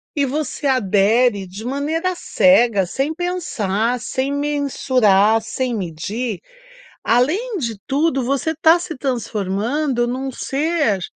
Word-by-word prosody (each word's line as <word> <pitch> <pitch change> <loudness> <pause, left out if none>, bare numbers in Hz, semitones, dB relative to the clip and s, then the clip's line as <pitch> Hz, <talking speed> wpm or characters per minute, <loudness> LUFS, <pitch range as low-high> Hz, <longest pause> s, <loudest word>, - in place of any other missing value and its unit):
E 285 -2 +2
você 290 +1 -3
adere 210 -2 +2
de 200 +5 -9
maneira 305 +7 -1
cega, 240 - +3
sem 270 - -2
pensar, 250 - -1
sem 260 +4 -2
mensurar, 255 -7 +2
sem 245 +2 -3
medir, 200 +4 -4 0.7
além 360 - +1
de 230 -7 -3
tudo 275 -1 +1
você 275 +5 -1
tá 325 +2 +6
se 335 -2 -6
transformando 240 +2 -1
num 260 +2 -3
ser 280 - 0
255 Hz, 115 wpm, -20 LUFS, 220-290 Hz, 0.7 s, tá